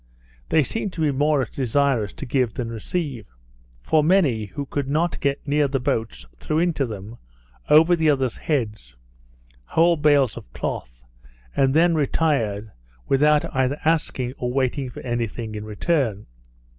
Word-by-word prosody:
They 155 - +4
seemed 200 - -3
to 165 - -5
be 150 -2 +2
more 145 0 +2
desirous 130 -4 0
to - - -7
give 125 -3 0
than 115 -2 -4
receive; 125 - -4 0.6
for 155 - +3
many 150 - +3
who 120 +9 -6
could 140 0 -3
not 160 +5 0
get 140 +1 -2
near 145 0 +2
the 135 0 -1
boats, 110 - -2
threw 155 - -2
into 165 -5 +1
them, 110 +1 -8 0.5
over 160 +4 +6
the 160 -2 +2
others 135 -4 +1
heads, 105 - -3 0.7
whole 165 - +3
bales 145 -5 +3
of - - -11
cloth, - - -5 0.5
and 135 -1 +3
then 170 +1 +5
retired, 130 -9 0 0.4
without 150 +2 +3
either 130 +2 +1
asking, 140 -6 0
or 125 0 -2
waiting 130 +1 -1
for - - -9
any 120 -2 -1
thing 110 0 -7
in 105 0 -6
return. 110 - -1
135 Hz, 155 wpm, -23 LUFS, 115-150 Hz, 0.7 s, over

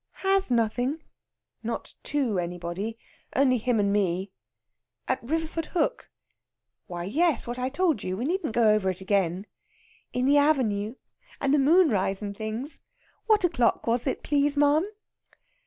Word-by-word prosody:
"Has 390 -2 +3
nothing?" 245 +6 0 0.6
"Not - - -5
to 255 -10 0
anybody. 175 +5 -4 0.4
Only 255 -2 +3
him 240 0 +1
and 200 -1 +2
me." 190 -1 0 0.8
"At 260 0 0
Riverfordhook?" 320 +4 -2 0.8
"Why, 175 -1 -5
yes, 305 - +1
what 240 +1 -5
I 255 +1 -1
told 320 - +1
you. 185 0 -3
We 240 - -2
needn't 335 - -1
go 235 -2 +4
over 210 -3 +2
it 185 +1 -4
again." 190 -1 0 0.7
"In 250 0 0
the 285 +2 +5
avenue. 235 -7 +1 0.4
And 275 0 +1
moonrise 245 - +3
and 200 -1 -4
things. 220 +8 -5 0.5
What 425 -3 +4
o'clock 295 -10 +2
was 235 +3 0
it, 265 - -2
please, 290 0 +1
ma'am?" 295 +5 +4
245 Hz, 140 wpm, -27 LUFS, 200-295 Hz, 0.8 s, the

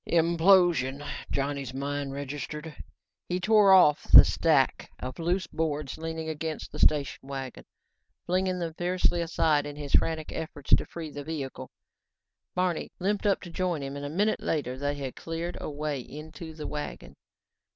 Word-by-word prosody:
"Implosion," 165 -5 +3 0.2
Johnny's 140 -2 -2
mind 140 0 -3
registered. 145 +3 -6 0.5
He 180 +1 0
tore 210 +1 +5
at 180 -6 +7
the - - +12
stack 150 -5 +2
of 130 +4 -7
loose 175 +3 0
boards 150 -3 -3
leaning 160 0 -4
against 160 0 -4
the - - -8
station 140 -2 +2
wagon, 135 -2 -6 0.6
flinging 185 +1 0
them 170 -2 -3
fiercely 175 0 +1
aside 160 -3 +1
in 145 - -7
his 145 -1 -7
frantic 160 -1 +2
efforts 145 -3 -7
to - - +5
free 160 -3 -7
the 145 0 -7
vehicle. 145 -3 -5 0.9
Barney 180 -2 -1
limped 205 +3 0
up 200 - +2
to 175 - -9
join 175 -4 -1
him 135 0 -5
and 140 - -6
a 145 - -4
minute 205 +8 +1
later 140 -5 -2
they 145 +2 -2
had 135 -3 -5
cleared 165 +1 -4
a - - -4
way 150 -1 -3
into 155 +4 -9
the 155 -1 -7
wagon. 150 0 -6
155 Hz, 160 wpm, -28 LUFS, 145-170 Hz, 0.9 s, the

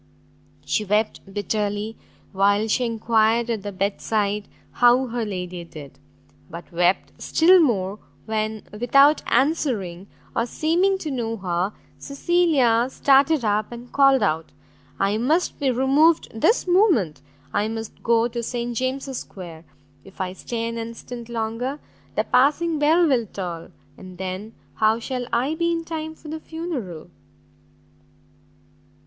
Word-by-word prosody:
She 215 - 0
wept 210 -1 -1
bitterly 205 +1 -2 0.4
while 200 +2 +2
she 245 +3 +1
enquired 230 0 +2
at 220 -3 -2
the 205 +1 -5
bed 195 +1 -2
side 210 -1 -1 0.2
how 245 +2 +4
her 240 -1 -3
lady 180 -4 -5
did, 150 -4 -12 0.5
but 170 +3 -10
wept 175 +2 +1
still 360 +3 +5
more, 210 - +1 0.3
when, 215 -1 -2
without 275 +7 +4
answering, 220 - 0 0.3
or 230 - 0
seeming 350 +8 +1
to 315 -6 -5
know 230 -3 -2
her, 180 0 -1 0.3
Cecilia 280 -6 +2
started 275 0 +3
up, 210 +1 0
and 240 +1 -10
called 275 -1 +4
out, 160 +1 -1 0.5
"I 200 +2 +1
must 310 +9 +1
be 280 -2 +1
removed 275 +6 +3
this 370 - +2
moment! 350 - +3 0.3
I 210 - +1
must 225 0 -6
go 230 0 +3
to 235 0 -4
St 240 0 -3
James's 260 +2 -2
square, 170 -4 -10 0.4
if 195 0 -17
I 185 -1 -2
stay 230 +4 -4
an 230 0 -4
instant 230 +1 -7
longer, 235 +5 -3 0.4
the - - +2
passing 305 +4 +2
bell 325 +4 +4
will 245 -6 +1
toll, 175 -4 -6 0.3
and 185 -1 -11
then 190 +4 -5 0.2
how 220 +1 +3
shall 245 +1 -4
I 260 +6 +1
be 340 +1 0
in 335 -1 -1
time 315 -1 -5
for 315 - -14
the 315 +1 -5
funeral?" 310 - -6
230 Hz, 140 wpm, -23 LUFS, 205-275 Hz, 0.5 s, still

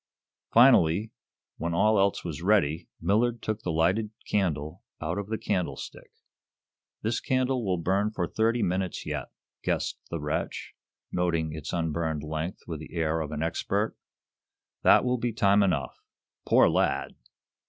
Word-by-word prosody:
Finally, 110 -5 +5 0.5
when 85 0 -2
all 105 +3 +4
else 100 -1 +1
was 85 -2 -5
ready, 85 -5 +2
Millard 115 +7 +1
took 110 -1 -3
the 90 - -2
lighted 90 +7 +2 0.2
candle 80 -7 -1 0.2
out 80 +5 -2
of 100 - -5
the 110 +1 -2
candlestick. 90 -11 -3 0.9
"This 110 +1 0
candle 130 -1 0
will 95 -3 0
burn 95 +5 +1
for 95 -5 -2
thirty 115 +5 +1
minutes 90 0 -1
yet," - - -4 0.3
guessed - - -1
the 85 - -3
wretch, 75 0 -3 0.4
noting 85 -3 0
its 80 -1 -6
unburned 80 -2 -1
length 80 +3 -4
with 80 -3 -5
the 80 +2 -10
air 80 -1 0
of 75 -1 -4
an 75 +1 -2
expert 100 +6 -1 0.9
"That - - +6
will 125 0 +1
be 120 0 -1
time 100 -2 +4
enough. 80 -10 0 0.5
Poor - - +6
lad!" - - +1
90 Hz, 145 wpm, -27 LUFS, 80-110 Hz, 0.9 s, That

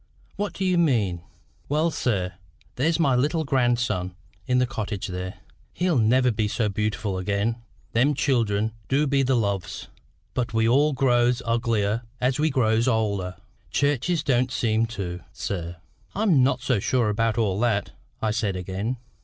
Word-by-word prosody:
"What 205 0 -3
do 190 - -2
you 180 -2 +3
mean?" 110 - +1 0.5
"Well, 155 +3 +2
sir, 95 - -1 0.4
there's 160 +6 +1
my 140 -6 +3
little 150 +6 +1
grandson 120 - 0 0.3
in 125 -1 +2
the 125 - +4
cottage 105 -6 -4
there: 90 +1 -5 0.4
he'll 175 -6 +1
never 125 +3 +4
be 110 -1 0
so 105 +1 0
beautiful 105 -1 -2
again. 100 +4 0 0.4
Them 135 +6 +3
children 110 -6 +1 0.2
du 140 +3 +2
be 140 -1 +2
the 130 0 +2
loves. 100 -6 -2 0.4
But 125 -2 -2
we 115 0 +3
all 145 +5 +4
grows 125 -1 +2
uglier 115 -2 +1 0.2
as 125 +2 +1
we 155 +1 +3
grows 115 -3 +2
older. 100 -6 0 0.3
Churches 145 +4 +1
don't 125 -3 +1
seem 115 -2 +1
to, 95 -6 -5
sir." 85 -3 -4 0.4
"I'm 195 -9 +3
not 130 +2 +2
so 125 -6 +1
sure 120 +2 +1
about 110 +1 0
all 100 -4 +1
that," 115 -4 +1 0.3
I 110 - +2
said 105 -3 -1
again. 95 +7 -3
115 Hz, 155 wpm, -25 LUFS, 105-130 Hz, 0.5 s, the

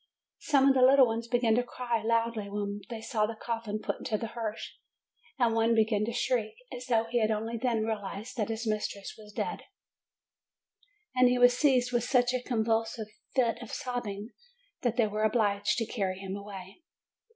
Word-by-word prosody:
Some 275 -3 +3
of - - +6
the 260 - +2
little 265 +1 +7
ones 230 0 -3
began 240 -2 +2
to 245 +2 +3
cry 240 -2 -2
loudly 230 -2 0
when 205 0 -3
they 230 -2 -5
saw 215 -2 0
the 225 - -5
coffin 225 -2 -3
put 215 - -4
into 215 - -1
the 225 +1 -5
hearse, 225 -3 -4 0.6
and 240 -3 +3
one 225 +1 +3
began 215 -1 +2
to 235 - -3
shriek, 235 -2 0 0.2
as 250 +1 -8
though 230 -3 +3
he 235 +1 -1
had 215 - +2
only 220 +2 -1
then 230 -2 0
realized 215 +1 -4
that 215 -2 -1
his 225 +1 -3
mistress 210 -2 -3
was 210 -1 -13
dead; - - -3 1.5
and 255 -1 +5
he 250 - +2
was 245 0 +6
seized 255 -2 +3
with 240 -1 +1
such 245 0 +2
a 255 - 0
convulsive 225 -2 -1 0.3
fit 235 -2 +2
of 240 - -8
sobbing, 240 -6 -4 0.5
that 240 -1 0
they 235 - +4
were 210 0 -3
obliged 205 -2 +2
to 230 - 0
carry 195 -5 -2
him 195 0 -5
away. 200 - -9
225 Hz, 185 wpm, -30 LUFS, 215-245 Hz, 1.5 s, little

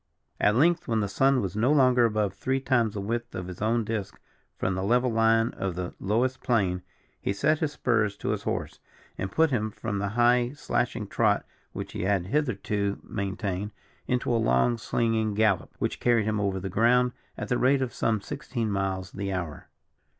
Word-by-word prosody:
At 105 +1 +3
length, 165 +6 +3
when 115 -2 +1
the 105 - 0
sun 135 +6 +3
was 95 0 -3
no 115 +6 +2
longer 125 -4 +5
above 105 -3 0
three 130 +7 -1
times 120 -5 +1
the 100 - -2
width 120 +4 -3
of 90 - -4
his 90 +1 -8
own 115 +2 +2
disc 105 -3 -4 0.4
from 95 - 0
the 95 - -2
level 120 +5 +2
line 115 0 +3
of 95 -3 -4
the 90 -1 -4
lowest 120 +6 0
plain, 95 -7 +1 0.4
he - - -1
set 150 +10 +1
his 150 -2 -1
spurs 105 -7 +1
to - - -4
his - - -1
horse, - - -3 0.4
and 95 - -3
put 160 +5 +3
him 110 -4 0
from 105 -1 -4
the 100 - -1
high 120 +1 +4
slashing 120 -6 -1
trot 105 +1 +1 0.3
which - - -6
he - - -5
had 95 -1 +1
hitherto 100 -5 -1
maintained, 100 -1 -3 0.4
into 125 -1 0
a 115 - +2
long 110 - +2
slinging 110 -2 0
gallop, 105 -4 +2
which - - -2
carried 120 -3 +3
him 110 -1 0
over 100 -2 0
the 95 - -4
ground 120 +5 +3 0.3
at - - -5
the 125 - +1
rate 135 +1 +3
of 125 - -4
some 110 -2 0
sixteen 115 +2 -4
miles 95 -1 -2
the 100 0 -4
hour. 85 -6 -5
110 Hz, 195 wpm, -27 LUFS, 100-120 Hz, 0.4 s, longer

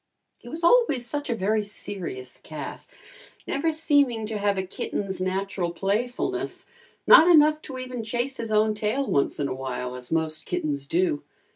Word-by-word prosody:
He 240 - -12
was 325 +6 -7
always 340 - +4
such 290 +3 -4
a 235 - +1
very 215 +1 +1
serious 195 -10 -6
cat, 155 -1 -8 0.6
never 320 +4 0
seeming 285 -8 +2
to 215 -1 -3
have 200 -1 +1
a 190 - 0
kitten's 190 0 -4
natural 185 -1 -1
playfulness, 205 +8 -2 0.4
not 320 - +9
enough 310 -2 +6
to 265 -4 -8
even 255 -2 -5
chase 240 +4 -2
his 225 -1 -4
own 215 0 +3
tail 215 +6 -1
once 140 - 0
in 145 - 0
a 130 - -2
while 130 -1 -4
as 125 -1 -9
most 160 -1 -1
kittens 140 -2 -2
do. 170 -2 +1
210 Hz, 165 wpm, -25 LUFS, 175-255 Hz, 0.6 s, not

